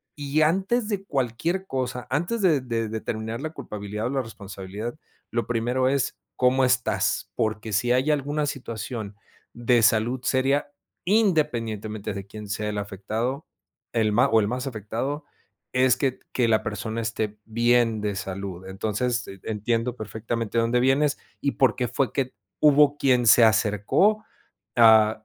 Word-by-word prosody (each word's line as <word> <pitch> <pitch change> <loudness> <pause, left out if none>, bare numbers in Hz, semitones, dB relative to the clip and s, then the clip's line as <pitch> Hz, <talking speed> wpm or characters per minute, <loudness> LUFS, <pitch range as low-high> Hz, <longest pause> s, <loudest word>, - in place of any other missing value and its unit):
y 145 +1 0
antes 195 +8 +2
de 200 -2 -2
cualquier 145 +7 -1
cosa, 125 -3 -3
antes 175 - 0
de 160 -7 +4
de 115 -3 -2
determinar 110 +1 -4
la 155 - -3
culpabilidad 105 -6 -5
o - - -2
la 135 -1 0
responsabilidad, 100 0 -7 0.4
lo 120 0 -1
primero 120 +2 +1
es: 135 -1 0 0.2
"¿Cómo 130 +1 +3
estás?". 130 -1 0
Porque 110 -1 -2
si 120 +5 +1
hay 130 +5 +3
alguna 145 +1 0
situación 115 -5 -5 0.4
de 120 0 +2
salud 115 +3 +3
seria, 135 +3 +1 0.3
independientemente 115 - 0
de 100 -1 -7
quién 105 +1 -9
sea 105 +1 -2
el 105 - -3
afectado, 110 - -3 0.5
el 110 -2 +2
ma 120 +4 +4
o 115 - +5
el 100 - 0
más 125 +4 -3
afectado 130 +6 -4 0.5
es 130 -1 +4
que 130 0 -1
que 125 -2 +2
la 110 -1 +3
persona 110 +2 -3
esté 110 -2 -3
bien 115 -1 +2
de 105 -1 -2
salud, 95 -1 -5
entonces 110 +5 -1 0.2
entiendo 115 +3 -1
perfectamente 115 0 -4
de 115 - +4
dónde 120 +2 +2
vienes 140 +3 +2 0.2
y 140 - +1
por 130 -5 +3
qué 125 -1 -1
fue 135 +2 0
que 130 -2 -1 0.3
hubo 145 -1 +5
quien 125 -4 +3
se 115 +2 +8
acercó, 115 - +2 0.5
a 110 -2 +6
120 Hz, 150 wpm, -25 LUFS, 110-135 Hz, 0.5 s, se